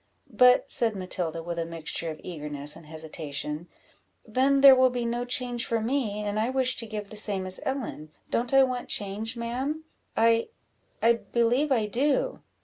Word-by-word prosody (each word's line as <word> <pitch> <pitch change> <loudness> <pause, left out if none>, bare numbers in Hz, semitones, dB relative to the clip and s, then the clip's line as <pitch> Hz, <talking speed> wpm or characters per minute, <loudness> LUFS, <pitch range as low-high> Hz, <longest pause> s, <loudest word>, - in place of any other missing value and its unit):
"But," 250 0 +5
said 225 -3 +2
Matilda, 175 -3 -2
with 170 0 -4
a - - 0
mixture 165 0 -3
of 155 - -7
eagerness 150 -3 -3
and 155 - -14
hesitation, 155 0 -5 0.6
"then 270 +5 +2
there 275 -1 +10
will 255 0 +5
be 245 -1 -3
no 240 +1 -2
change 245 -1 -1
for 230 - -1
me, 220 -3 -1
and 205 +1 -2
I 225 +3 +1
wish 260 -1 +3
to 230 - -3
give 210 -2 -6
the - - -8
same 205 -3 0
as 185 0 0
Ellen; 255 - -4 0.2
don't 240 +1 0
I 270 0 +6
want 255 -1 -2
change, 215 +4 -2
ma'am? 260 +7 -3 0.3
I 230 0 +3 0.6
I 230 +1 +6
believe 240 +5 0
I 230 -5 +2
do." 265 +7 0
230 Hz, 175 wpm, -27 LUFS, 180-250 Hz, 0.6 s, there